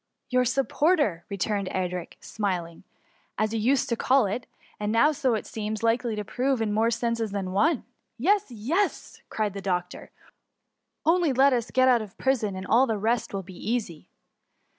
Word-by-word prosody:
* - - -56
" - - -54
Your 250 0 +3
supporter,^ 275 - +1
returned 200 0 -1
Edric, 180 -2 -3
smiling, 180 -6 -3
^* - - -18 0.5
as 215 +1 0
you 225 - 0
used 260 +5 +2
to 235 - +1
call 260 +1 +3
it; 210 +5 -3 0.3
and 210 +2 -1
as 295 +3 +3
it 260 - +4
now 220 - 0
seems 215 0 -5
likely 230 0 +1
to 210 -1 -4
prove, 260 +4 0
in 215 -2 0
more 220 +2 +2
senses 230 -1 -1
than 195 -2 -3
one.*^ 280 - +2 0.3
Yes, 395 - +2
yes 260 - -2
V^ - - -49
cried 210 -3 -1
the 200 - -6
doctor, 180 -2 -3 0.5
" - - -55
only 335 -1 +3
let 270 +2 +5
us 235 -2 -1
get 255 0 +3
out 245 -3 +5
of 205 -3 -10
prison, 230 -7 0
and 185 0 -6
all 245 +7 +4
the 220 -2 0
rest 225 +3 0
will 195 -1 -4
be 185 +1 -12
easy. 210 -7 -3
225 Hz, 195 wpm, -26 LUFS, 200-255 Hz, 0.5 s, let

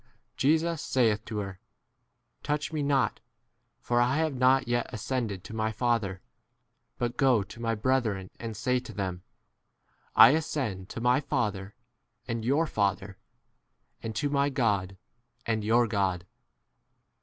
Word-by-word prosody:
Jesus 160 +3 +2
saith 110 -5 +1
to 110 - -5
her, 100 -2 -5 0.8
Touch 150 +2 -2
me 155 - -1
not, 135 -6 +1 0.6
for 120 0 +1
I 125 +4 +2
have 160 -2 +1
not 130 0 +3
yet 120 0 0
ascended 110 -5 -3
to - - -9
my 110 0 0
Father; 110 -6 -1 0.8
but 120 0 -2
go 130 -7 +4
to 115 - -12
my 115 -1 0
brethren 110 -5 0
and 115 -2 -6
say 125 +3 +1
to 125 - -10
them, 95 -3 -3 0.9
I - - +10
ascend 130 -11 -2
to 115 - -6
my 125 +2 +3
Father 105 -8 -2 0.5
and 115 -2 -3
your 140 +7 +2
Father, 100 - -1 0.8
and 110 -1 -5
to 130 +7 0
my 140 0 +2
18 145 - -4
God 100 -7 0 0.5
and 110 -2 -1
your 115 +3 +4
God. 95 -5 -1
115 Hz, 145 wpm, -28 LUFS, 105-130 Hz, 0.9 s, I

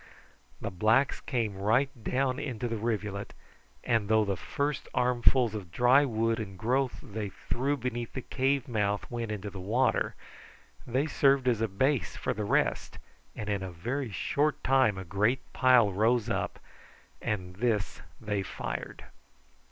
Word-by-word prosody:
The - - -4
blacks 110 +9 +2
came 115 -6 -1
right 120 +8 +2
down 130 +2 0
into 125 -5 -3
the 115 - -2
rivulet, 105 -3 -3 0.5
and 115 -3 +1
though 110 -1 +4
the 100 -1 0
first 145 +8 -3
armfuls 125 -1 +3
of 100 -5 -6
dry 125 - +5
wood 115 -2 0
and 95 -3 -6
growth 125 +5 0
they 105 -4 -5
threw 135 +8 -2
beneath 120 -2 -4
the 130 - -5
cave 135 0 0
mouth 105 -4 0
went 120 -2 -3
into 105 -1 -4
the 95 - -8
water, 110 +8 +1 0.7
they 130 +4 +1
served 135 -3 +3
as 115 -3 +2
a 115 - +2
base 130 +7 0
for - - -1
the 105 0 -3
rest, - - 0 0.4
and 105 - -5
in 100 -2 -1
a 95 - -4
very 120 +10 -3
short 145 +9 0
time 130 -6 +3
a 95 - -6
great 105 +8 0
pile 125 -5 +5
rose 110 +3 +2
up, - - -2 0.6
and 90 -3 -3
this 110 -3 0 0.2
they 105 -3 -2
fired. 95 - -5
115 Hz, 155 wpm, -29 LUFS, 105-130 Hz, 0.7 s, dry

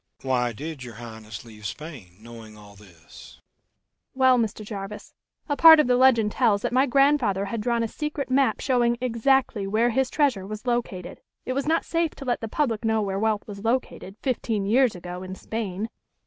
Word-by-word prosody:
"Why 125 -2 0
did 145 +4 -7
your 120 -2 -10
Highness 110 -2 -9
leave 110 -2 -14
Spain, 125 - -9
knowing 110 -1 -12
all 105 -1 -15
this?" 90 -6 -16 0.8
"Well, 260 -1 +4
Mr. 215 -1 -2
Jarvis, 200 0 -7 0.3
a 290 - 0
part 320 +1 +9
of 300 - +4
the 250 0 +3
legend 240 -4 +4
tells 210 -5 +2
that - - -2
my 260 +2 +3
grandfather 275 -7 +2
had 220 +2 -4
drawn 235 +1 0
a - - -1
secret 295 +1 -5
map 270 0 +2
showing 240 -2 +1
exactly 245 -3 +1
where 225 +4 +2
his 265 +2 +1
treasure 260 -11 0
was 215 +3 -7
located. 240 -7 -3 0.2
It 255 - -2
was 275 +2 -2
not 325 +1 +1
safe 330 -1 -1
to 275 - -9
let 245 -2 -1
the 225 - -4
public 235 -3 -1
know 220 -1 +1
where 195 -1 -2
wealth 215 -1 0
was 200 -1 -9
located, 230 -5 -2
fifteen 225 -6 -1
years 235 +1 +3
ago, 180 0 -7
in 185 0 -7
Spain." 215 -1 -4
220 Hz, 190 wpm, -25 LUFS, 180-255 Hz, 0.8 s, part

